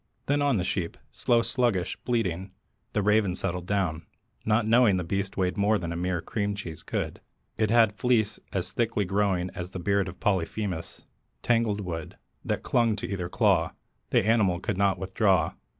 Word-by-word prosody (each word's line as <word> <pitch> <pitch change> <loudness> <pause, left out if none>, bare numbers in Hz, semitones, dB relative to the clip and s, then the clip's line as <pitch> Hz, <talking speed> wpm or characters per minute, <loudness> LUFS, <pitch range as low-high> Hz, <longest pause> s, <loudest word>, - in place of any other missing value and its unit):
Then 145 +1 +1
on 140 -5 +3
the 90 - 0
sheep, 90 -2 -2
slow, 120 -1 +2
sluggish, 115 -9 +1
bleating, 95 -6 -1 0.4
The 105 - +1
Raven 105 -3 +3
settled 90 -1 -3
down, 90 -6 -1 0.4
not 110 +1 +2
knowing 115 -3 +5
The 90 - -1
beast 95 +2 -3
weighed 95 +1 0
more 105 +2 +3
than 85 -3 -4
a - - -3
mere 90 0 -1
cream 100 +2 -2
cheese 85 -6 -7
could. - - -4 0.3
It 110 -1 +1
had 115 -1 +5
a - - -23
fleece 110 -2 +1
as 95 -2 -2
thickly 115 -3 0
growing 95 -2 0
As 90 0 -6
beard 95 +1 0
of 85 - -11
Polyphemus 95 -2 -2 0.4
tangled 115 -4 +2
wood 85 -4 -5 0.3
That - - -2
clung 115 -3 +2
to 105 - -4
either 90 -2 -3
claw; - - +2 0.4
the - - +3
animal 105 -6 +3
could - - -2
not 100 0 +2
withdraw. 95 -1 +1
100 Hz, 175 wpm, -27 LUFS, 90-110 Hz, 0.4 s, knowing